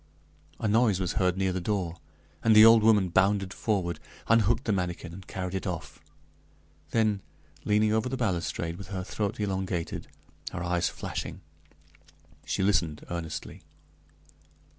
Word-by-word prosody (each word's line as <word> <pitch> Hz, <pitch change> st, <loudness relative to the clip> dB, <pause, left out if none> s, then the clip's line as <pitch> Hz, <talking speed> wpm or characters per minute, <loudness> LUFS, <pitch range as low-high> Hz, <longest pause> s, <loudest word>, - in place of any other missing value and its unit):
A 110 Hz, -, -1 dB
noise 110 Hz, -2 st, +3 dB
was 90 Hz, -2 st, -1 dB
heard 90 Hz, -1 st, +1 dB
near 95 Hz, -1 st, +1 dB
the 95 Hz, -, -2 dB
door, 90 Hz, -3 st, -2 dB, 0.5 s
and 110 Hz, -1 st, +5 dB
the 110 Hz, +1 st, +10 dB
old 115 Hz, 0 st, +8 dB
woman 105 Hz, -4 st, +4 dB
bounded 95 Hz, +1 st, +2 dB
forward, 90 Hz, -7 st, -1 dB, 0.3 s
unhooked 115 Hz, +2 st, +3 dB
the 110 Hz, -, +1 dB
manikin 90 Hz, -3 st, -2 dB
and 95 Hz, +2 st, -11 dB
carried 90 Hz, -1 st, -4 dB
it 95 Hz, +1 st, -3 dB
off; 80 Hz, -6 st, -5 dB, 0.9 s
then, 110 Hz, -3 st, +1 dB, 0.4 s
leaning 105 Hz, +1 st, +3 dB
over 110 Hz, +3 st, +1 dB
the 130 Hz, -, -3 dB
balustrade 85 Hz, -6 st, -2 dB
with 100 Hz, 0 st, -9 dB
her 95 Hz, -2 st, -4 dB
throat 105 Hz, +2 st, -3 dB
elongated, 95 Hz, -4 st, -2 dB, 0.5 s
her 85 Hz, -, -3 dB
eyes 90 Hz, -1 st, +1 dB
flashing, -, -, -5 dB, 1.1 s
she -, -, 0 dB
listened 85 Hz, -6 st, +1 dB
earnestly. 85 Hz, -2 st, -5 dB
95 Hz, 140 wpm, -28 LUFS, 90-105 Hz, 1.1 s, the